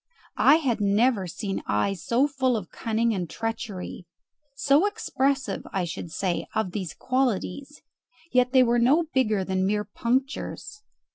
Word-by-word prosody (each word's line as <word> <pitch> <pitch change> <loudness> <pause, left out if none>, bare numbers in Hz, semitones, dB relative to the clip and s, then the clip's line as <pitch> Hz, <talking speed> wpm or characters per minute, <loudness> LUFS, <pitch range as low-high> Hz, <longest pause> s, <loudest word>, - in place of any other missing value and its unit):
I 285 - +7
had 260 -9 0
never 205 0 +2
seen 195 +2 -4
eyes 170 - 0
so 250 +5 +2
full 260 -4 0
of 185 -6 -7
cunning 230 0 0
and 180 -5 -3
treachery 205 -4 -5 0.5
so 285 +7 +3
expressive, 275 - -1
I 190 -3 -1
should 170 0 -6
say, 180 +1 -2
of 220 -4 0
these 185 -4 -5
qualities; 260 +2 -2 0.5
yet 250 0 +3
they 260 -1 +6
were 240 0 +2
no 275 +8 +4
bigger 215 -7 +2
than 190 0 0
mere 210 +1 0
punctures. 265 - -3
230 Hz, 145 wpm, -26 LUFS, 195-265 Hz, 0.5 s, I